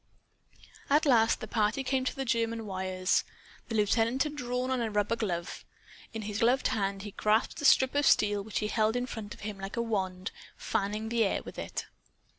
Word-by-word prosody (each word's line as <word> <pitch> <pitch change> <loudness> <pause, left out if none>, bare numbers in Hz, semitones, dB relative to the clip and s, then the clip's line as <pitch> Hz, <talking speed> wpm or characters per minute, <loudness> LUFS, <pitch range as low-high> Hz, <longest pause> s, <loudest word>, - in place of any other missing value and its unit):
At 295 +3 +4
last 230 -5 +4
the 220 - -5
party 215 +5 +1
came 260 0 0
to - - -1
the 270 - -3
German 230 -1 0
wires. 185 -1 0 0.5
The 225 - -2
lieutenant 225 +4 +2
had 300 -1 -5
drawn 250 -1 -2
on 255 -2 0
a 230 - -1
rubber 210 +1 +1
glove. 180 -7 -3 0.5
In 225 -2 -5
his 210 0 -3
gloved 245 +3 +3
hand 195 -2 -1
he 205 - -6
grasped 215 +7 +1
a - - -2
strip 260 -1 +5
of 290 0 +2
steel 205 -1 +3
which 215 +1 -4
he 210 - 0
held 215 +1 +1
in 245 0 0
front 220 -4 -7
of - - -17
him, 210 -1 -5
like 195 +3 -6
a - - +2
wand, 190 -4 -2 0.3
fanning 210 +2 -2
the 230 -1 +2
air 195 - 0
with - - -9
it. - - -4
220 Hz, 205 wpm, -30 LUFS, 205-245 Hz, 0.5 s, strip